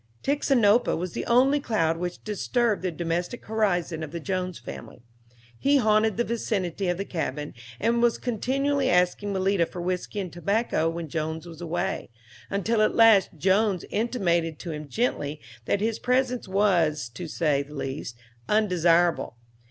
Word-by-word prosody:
Tixinopa 250 -6 +3
was 180 +1 -3
the - - -4
only 265 +5 +4
cloud 210 - 0
which 175 +1 -5
disturbed 220 +1 0
the 185 - -1
domestic 175 +6 -3
horizon 180 -7 0
of 155 - -5
the 170 +3 -5
Jones 185 0 -3
family. 65 - -10 0.6
He 285 +1 +4
haunted 215 -3 +3
the 240 - +2
vicinity 200 -6 -2
of 175 -1 0
the 195 - -3
cabin, 150 -5 -4 0.3
and 235 - +1
was 240 -1 +3
continually 270 +4 0
asking 180 +3 +2
Malita 190 -2 +1
for 180 - -8
whiskey 180 +3 -3
and 185 -4 -5
tobacco 185 -2 0
when 165 0 -5
Jones 160 +2 -3
was 165 0 -11
away, 175 +3 -2 0.4
until 215 +3 0
at 215 - +2
last 225 -4 +6
Jones 190 +3 +2
intimated 175 -8 0
to 170 - -6
him 150 -1 -6
gently 155 - -1 0.3
that 200 - 0
his 220 0 -1
presence 250 -1 0
was, 175 -8 +2
to 165 +9 -7
say 150 -2 +1
the 145 +2 -10
least, 135 -4 -5 0.3
undesirable. 175 - +2
185 Hz, 155 wpm, -26 LUFS, 165-220 Hz, 0.6 s, last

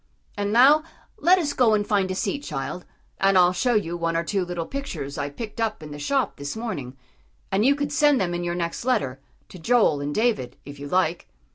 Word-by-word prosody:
And 205 0 -2
now 270 +7 +6 0.4
let 355 +5 +5
us 300 -5 -1
go 230 -4 +4
and 205 -1 0
find 200 -3 +1
a 185 - -2
seat, 280 - -1
child, 165 - -5 0.3
and 195 0 +4
I'll 180 0 +5
show 245 +6 +1
you 175 -5 0
one 165 -1 -1
or 165 - 0
two 195 +2 -1
little 175 -2 -4
pictures 165 - -5
I 145 0 -3
picked 220 +9 -7
up 220 -7 -2
in 150 - -9
the 145 - -7
shop 270 - 0
this 140 0 -5
morning; 140 - -5 0.5
and 195 +2 +2
you 275 +4 +4
can 285 0 -3
send 295 -2 +4
them 175 -2 -1
in 175 0 -3
your 175 0 -2
next 170 +2 -3
letter, 200 - 0 0.3
to 185 - -11
Joel 185 -7 +3
and 145 +1 -3
David, 215 - 0
if 145 0 -10
you 145 - -6
like." 175 0 0
185 Hz, 225 wpm, -24 LUFS, 160-240 Hz, 0.5 s, now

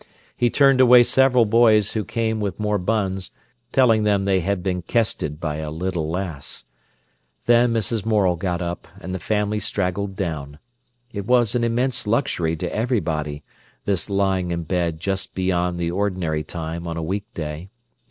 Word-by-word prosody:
He 120 - +2
turned 135 0 +4
away 125 -1 +8
several 125 0 +4
boys 110 -2 +4
who 110 - -1
came 110 +1 -1
with 100 -1 -3
more 105 -1 0
buns, 95 -1 -1 0.4
telling 115 -5 +4
them 100 -2 +2
they 95 -1 +2
had 95 0 -1
been 90 -2 -1
"kested" 85 -8 -1
by 75 -3 -3
a 80 -1 -4
little 80 0 -3
lass. 85 -5 -5 0.8
Then 120 0 +4
Mrs. 115 -1 0
Morel 105 -5 +2
got 90 0 -2
up, 85 0 -5
and 95 -1 -6
the 95 - -3
family 105 +3 0
straggled 95 0 -2
down. 75 -6 -4 0.6
It 100 -1 -5
was 120 -4 +3
an 120 - 0
immense 120 0 0
luxury 105 - 0
to 80 - -4
everybody, 80 - -1 0.4
this 100 -1 -1
lying 95 -2 +1
in 85 -1 -2
bed 85 -1 -1
just 95 +3 -3
beyond 90 -1 0
the 85 -1 -1
ordinary 90 -5 -1
time 85 +1 -5
on 85 0 -4
a 85 - -3
weekday. 85 -3 -5
95 Hz, 160 wpm, -22 LUFS, 85-110 Hz, 0.8 s, away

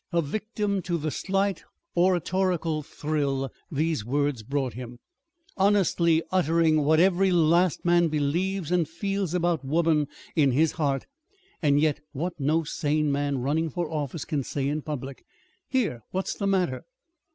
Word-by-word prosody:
a 170 - +2
victim 205 +4 -2
to 175 0 -1
the 155 -1 -2
slight 195 +3 -1 0.3
oratorical 175 -2 +1
thrill 145 -3 -2 0.2
these 155 -4 0
words 140 +1 0
brought 130 +1 -2
him, 120 +1 -8 0.6
"honestly 185 -5 +3
uttering 165 -3 +3
what 155 +2 +4
every 190 +1 +4
last 170 0 +3
man 175 0 +4
believes 165 +4 -1
and 175 -3 +2
feels 195 0 -2
about 170 -4 +1
woman 155 +1 +2 0.3
in 145 -4 +4
his 155 +4 +3
heart 140 -3 -1 0.6
and 145 -3 +3
yet 150 -1 +2
what 170 +6 -2
no 155 +4 +2
sane 150 0 0
man 140 0 0
running 160 +4 0
for 170 +3 -3
office 150 -1 -3
can 150 -4 -1
say 135 +1 -2
in 150 +2 -1
public 140 -3 -6 0.4
here, 220 - 0
what's 190 +1 -2
the 200 - -2
matter?" 185 -9 0
160 Hz, 145 wpm, -26 LUFS, 145-180 Hz, 0.6 s, what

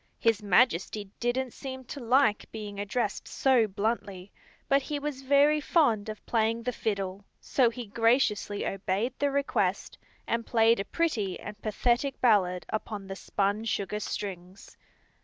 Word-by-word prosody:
His 225 -2 +2
Majesty 205 -1 +2
didn't 245 +1 -1
seem 260 -1 -7
to 270 +3 -8
like 245 -2 +2
being 210 -2 -7
addressed 205 +1 -2
so 255 -5 +3
bluntly, 200 -2 -3 0.4
but 275 0 +4
he 295 +2 -3
was 285 -2 -4
very 285 +3 +4
fond 235 - +2
of 215 - -8
playing 230 0 +1
the 250 - -1
fiddle, 200 -4 -3 0.2
so 250 -4 +2
he 240 +1 -7
graciously 225 -2 +1
obeyed 195 +5 -1
the 285 - +2
request 280 0 -1 0.3
and 230 0 -1
played 230 -1 +3
a 195 - -2
pretty 215 - -1
and 210 0 -9
pathetic 240 +5 0
ballad 185 -7 +3
upon 215 -2 -4
the 195 0 -6
spun 200 +2 -1
sugar 210 -1 -2
strings. 190 -2 -6
225 Hz, 145 wpm, -28 LUFS, 200-255 Hz, 0.4 s, but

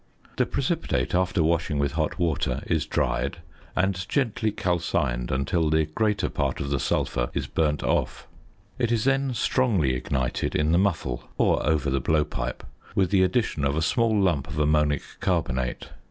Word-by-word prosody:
The - - +2
precipitate, - - -1
after 90 0 +2
washing 80 -2 +1
with 70 -1 +1
hot 80 0 -1
water, 85 -5 0
is - - 0
dried, 65 +5 -1 0.4
and 90 -1 0
gently 115 -5 0
calcined 80 -10 -1
until 75 +5 0
the 80 0 +3
greater 100 +5 0
part - - -2
of 70 - -3
the 70 - +1
sulphur - - 0
is - - -1
burnt 75 -2 0
off. - - -1 0.5
It 120 -2 +1
is 115 -3 +1
then 135 -1 +1
strongly 105 - +2
ignited 65 0 -2
in 75 +1 +2
the 85 - +4
muffle 80 -11 -1
(or - - +2
over 75 -2 +1
the 70 - +1
blowpipe) 75 +2 -1 0.3
with 95 -2 +2
the 95 -2 +4
addition 95 -4 +1
of 70 +1 +1
a 80 - 0
small 115 +2 +2
lump 85 -9 +1
of 75 -1 -7
ammonic 75 -1 +2 0.2
carbonate. 65 0 -1
80 Hz, 165 wpm, -25 LUFS, 70-95 Hz, 0.5 s, the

